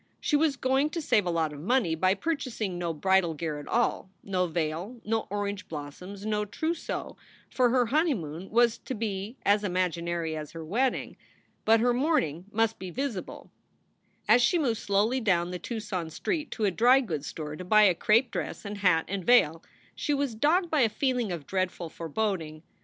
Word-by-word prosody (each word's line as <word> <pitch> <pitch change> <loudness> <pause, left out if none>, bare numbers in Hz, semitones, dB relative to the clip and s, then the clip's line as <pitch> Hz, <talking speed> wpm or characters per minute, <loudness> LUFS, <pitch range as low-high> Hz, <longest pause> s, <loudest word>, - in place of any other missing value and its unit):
She 295 - 0
was 295 -2 +2
going 265 +3 +2
to - - +1
save 210 - +2
a - - +1
lot 165 -3 0
of 145 - -9
money 205 - +1
by 185 +4 +2
purchasing 230 - -3
no 170 -1 -1
bridal 175 +1 +2
gear 150 -1 -3
at 145 - -10
all, 235 -4 0
no 185 -2 0
veil, 170 +8 -3
no 225 +1 -1
orange 205 0 -3
blos 145 -2 -7
soms, 195 +2 -9
no 210 -1 0
trousseau, 315 +11 -4 0.3
for 250 -2 +3
her 250 0 +3
honeymoon 220 - -1
was 235 0 +3
to 260 - -5
be 210 +2 -4
as 205 +1 +4
imag 180 -4 0
inary 170 -2 -2
as 155 -1 -7
her 165 -1 -7
wedding. 245 +10 -1 0.5
But 225 0 +5
her 245 +1 +3
mourning 240 - 0
must 225 +1 +1
be 185 - -6
visible. 240 -1 -5 0.8
As 245 - +6
she 345 +9 +3
moved 245 -9 0
slowly 210 +6 +1
down 180 -5 +1
the 180 - -4
Tucson 210 -5 -4
street 305 - -3
to 220 - -2
a 200 - +2
dry 245 +7 +5
goods 155 - -4
store 150 +2 -6
to 185 - -7
buy 215 +4 +5
a 190 -3 +6
crape 225 +7 +3
dress - - -4
and 205 0 -5
hat 180 -5 +3
and 195 -1 -3
veil, 165 -7 +4 0.3
she 295 - -1
was 280 -3 -1
dogged 330 - +2
by 305 -3 +3
a 230 - +4
feeling 245 -2 0
of 165 -5 -5
dreadful 185 -2 -2
foreboding. 165 -2 -3
205 Hz, 190 wpm, -28 LUFS, 170-245 Hz, 0.8 s, As